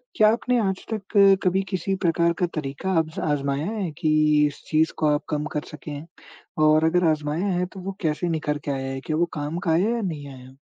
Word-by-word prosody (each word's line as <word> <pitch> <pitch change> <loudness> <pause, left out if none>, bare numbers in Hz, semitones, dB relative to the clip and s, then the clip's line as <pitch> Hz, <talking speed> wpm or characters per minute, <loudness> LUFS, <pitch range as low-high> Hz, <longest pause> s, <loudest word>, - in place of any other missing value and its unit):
क्या 215 0 +6
आपने 245 +1 0
आज 190 -1 -3
तक 210 0 -4 0.3
कभी 185 +1 +2
किसी 190 +1 -1
प्रकार 170 0 +2
का 180 - +3
तरीका 150 +5 -3
आज़ 160 0 -3
आज़माया 140 0 -1
है 205 -5 -2
कि 155 -1 +3
इस 145 - -8
चीज़ 160 +1 +2
को 155 - +1
आप 145 - -1
कम 150 -1 -1
कर 150 - 0
सकें? 150 0 -8 0.6
और 155 +1 +5
अगर 175 +2 +3
आज़माया 155 +5 -1
है 180 -2 0
तो 195 - -9
वो 190 +1 -5
कैसे 160 +1 -1
निखर 150 -2 -1
के 145 - -1
आया 135 -1 -3
है 135 0 -5
कि 155 - -1
वो 165 +3 +2
काम 145 +3 -3
का 175 -2 -1
आया 180 +7 +3
या 235 - -2
नहीं 155 -8 -4
आया? 130 0 -14
160 Hz, 220 wpm, -24 LUFS, 150-180 Hz, 0.6 s, क्या